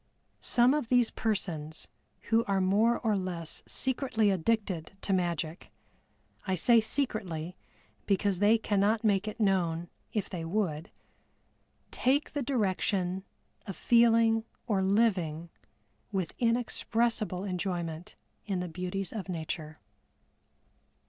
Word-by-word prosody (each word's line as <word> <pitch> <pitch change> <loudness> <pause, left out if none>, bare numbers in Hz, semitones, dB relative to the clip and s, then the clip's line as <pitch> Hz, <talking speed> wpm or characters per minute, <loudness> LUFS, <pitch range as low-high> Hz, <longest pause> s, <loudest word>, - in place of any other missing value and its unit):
Some 245 +2 +4
of 295 -5 -1
these 245 -2 +3
persons 165 -8 -2 0.4
who 225 +1 +4
are 195 -1 +1
more 205 +5 +3
or 220 -3 0
less 180 -4 -2
secretly 250 -5 +1
addicted 190 -3 -1
to 195 - 0
magic 170 -2 -2 0.8
(I 190 - +1
say 230 +6 +5
secretly, 190 - -2 0.5
because 195 -2 +1
they 210 +3 +5
cannot 210 +1 +1
make 205 -1 +2
it 215 - -5
known 175 -5 +1 0.2
if 210 -3 -2
they 175 -4 -5
would), 165 -3 -2 1.0
take 275 +4 +1
the 290 - -1
direction 190 -6 -1 0.4
of 195 - -5
feeling 230 -1 +4 0.2
or 205 -5 +1
living 190 -6 +1 0.6
with 190 -5 -2
inexpressible 230 -4 0
enjoyment 175 -3 -4 0.3
in 195 -3 -1
the 180 - -3
beauties 180 +2 -4
of 200 -4 -5
nature. 160 -2 -5
195 Hz, 115 wpm, -30 LUFS, 175-225 Hz, 1.0 s, say